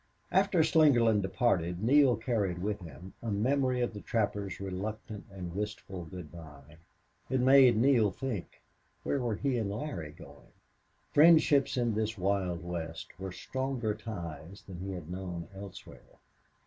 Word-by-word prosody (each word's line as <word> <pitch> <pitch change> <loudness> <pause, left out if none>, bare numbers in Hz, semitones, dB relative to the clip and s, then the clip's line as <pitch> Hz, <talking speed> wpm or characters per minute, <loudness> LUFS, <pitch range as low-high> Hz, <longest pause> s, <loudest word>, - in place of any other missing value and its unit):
After 190 -3 +3
Slingerland 120 -10 +4
departed 95 -3 0
Neale 135 +1 +5
carried 105 -6 -1
with 105 +3 -2
him 85 +1 -11
a 115 - -4
memory 125 +4 +1
of 120 - -1
the 105 - -7
trapper's 105 -4 -2
reluctant 105 +2 -5
and 90 -3 -7
wistful 100 -3 -5
good 80 -2 -9
bye. 75 -3 -13 0.5
It 130 0 +1
made 130 -2 +6
Neale 120 -3 +4
think 120 -4 -6 0.4
where 140 - 0
were 120 -4 -1
he 130 +1 0
and 105 -3 -2
Larry 100 - -5
going? - - -15 0.6
Friendships 150 -3 +5
in 120 -2 +1
this 110 +1 -1
wild 95 -2 -1
West 85 -2 -5
were 95 0 -5
stronger 130 +1 -2
ties 85 -5 -8
than 90 -3 -9
he 95 +1 -5
had 90 -4 -7
known 90 -2 -5
elsewhere. 100 -1 -10
105 Hz, 145 wpm, -31 LUFS, 90-125 Hz, 0.6 s, made